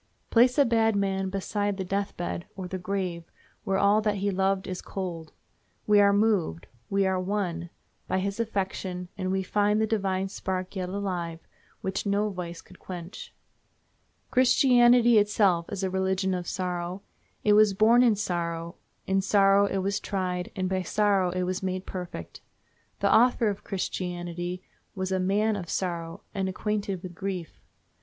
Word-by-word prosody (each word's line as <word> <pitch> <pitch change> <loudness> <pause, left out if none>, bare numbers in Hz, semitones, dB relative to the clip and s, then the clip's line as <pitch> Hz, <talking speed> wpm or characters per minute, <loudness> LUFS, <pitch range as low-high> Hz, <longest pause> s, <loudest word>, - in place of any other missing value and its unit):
Place 245 +3 +5
a 285 - +6
bad 225 -2 +2
man 195 -1 0
beside 205 +1 -2
the 190 - -2
death 195 +2 -2
bed, 175 0 -4
or 190 -2 -5
the 185 +1 -5
grave, 180 -2 -3 0.4
where 195 0 0
all 200 +2 +4
that 210 -1 0
he 200 +1 0
loved 190 0 +1
is 185 -1 -5
cold—we 170 - -2
are 200 0 +6
moved, 200 - +1 0.2
we 195 0 +2
are 190 -1 +1
won, 180 -3 -2 0.4
by - - 0
his 200 +3 -2
affection, 190 -4 -3
and 185 0 -2
we 190 0 0
find 210 +2 +2
the 220 - +3
divine 195 -3 0
spark 185 0 -4
yet 185 -1 -3
alive, 180 -4 -3 0.4
which 190 +2 -2
no 200 +1 +2
vice 175 -2 -6
could 185 - -17
quench. 175 0 -8 1.0
Christianity 245 -2 +5
itself 200 -5 +2
is 200 -1 -3
a 190 - +1
religion 190 0 0
of 180 -1 -3
sorrow. 180 0 -3 0.4
It 210 - +4
was 210 -1 +5
born 225 +4 +5
in 235 -4 +5
sorrow, 170 -4 -3 0.3
in 195 0 +2
sorrow 195 0 +4
it 195 -1 -1
was 200 +2 0
tried, 180 -2 -3
and 185 -2 -1
by 190 0 0
sorrow 195 0 +2
it 180 +1 -1
was 185 +1 -2
made 185 0 -3
perfect. 180 - -7 0.6
The 200 - +4
Author 235 -1 +4
of 200 - -8
Christianity 180 -1 -4 0.3
was 190 -1 -3
a 190 - +1
"man 205 +4 +1
of 180 -4 -6
sorrow 170 -3 -3
and 195 -2 -1
acquainted 200 -1 -2
with 180 -1 -7
grief." 185 -2 -5
190 Hz, 165 wpm, -27 LUFS, 180-205 Hz, 1.0 s, a